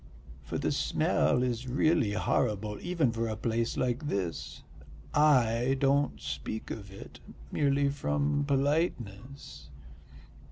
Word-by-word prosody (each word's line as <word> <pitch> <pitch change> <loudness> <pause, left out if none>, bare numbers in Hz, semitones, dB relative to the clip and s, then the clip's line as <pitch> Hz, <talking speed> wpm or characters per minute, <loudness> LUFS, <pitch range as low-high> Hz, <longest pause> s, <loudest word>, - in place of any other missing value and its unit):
For - - -5
the - - 0
smell 125 - +1
is 125 0 -2
really 140 -3 +2
horrible 105 0 0
even 170 -8 +1
for 115 0 -2
a 110 - -2
place 115 +1 -1
like 130 +4 -1
this. 95 - -3 0.5
I 130 -4 +3
don't 140 0 +2
speak 110 - -5
of 100 -3 -7
it, 95 - -11 0.3
merely 140 -1 +2
from 75 - 0
politeness." 135 - -2
120 Hz, 115 wpm, -30 LUFS, 105-140 Hz, 0.5 s, I